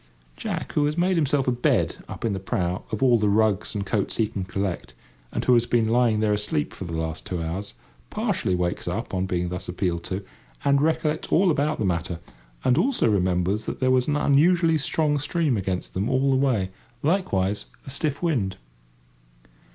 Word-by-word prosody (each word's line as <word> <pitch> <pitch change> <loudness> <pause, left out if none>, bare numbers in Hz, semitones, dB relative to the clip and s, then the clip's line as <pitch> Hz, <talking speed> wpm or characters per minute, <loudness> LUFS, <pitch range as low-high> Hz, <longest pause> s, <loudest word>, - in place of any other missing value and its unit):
Jack, - - -4
who 145 -1 +2
has 150 +2 -2
made 180 +2 +2
himself 145 -4 +1
a - - +4
bed 120 0 +1
up - - -5
in 110 - +1
the 95 - -2
prow 90 -1 -2
of 110 - -1
all 120 -3 +5
the 105 -1 +2
rugs 105 0 +1
and 100 -1 -2
coats 100 0 -1
he 110 - +3
can 100 -2 -4
collect, 95 0 -3 0.4
and - - -2
who 125 - +5
has 120 0 +3
been 115 -2 +2
lying 115 -2 +3
there 105 -1 +2
asleep 105 -8 -1
for 95 - -7
the 85 - -6
last 80 -1 -3
two 90 - -4
hours, 85 +5 -4 0.3
partially 90 - 0
wakes 90 0 -2
up 100 +7 -3
on 95 0 0
being 90 -1 -1
thus 90 +1 -5
appealed 90 -2 -1
to, 95 +2 -4 0.4
and 140 0 +4
recollects 155 0 0
all 180 +1 +4
about 150 +1 0
the 105 - -1
matter, 85 -2 -1 0.4
and 130 +4 +3
also 250 - +2
remembers 95 0 +1
that - - -4
there 130 -1 +2
was 130 -1 +3
an 150 - +1
unusually 165 +4 +4
strong 150 0 +1
stream 145 -1 0
against 95 -3 -3
them 100 +5 -1
all 135 +1 +2
the - - +3
way—likewise 120 - 0 0.2
a 135 - -6
stiff 145 +2 -2
wind. 120 - 0
110 Hz, 195 wpm, -25 LUFS, 95-140 Hz, 0.4 s, all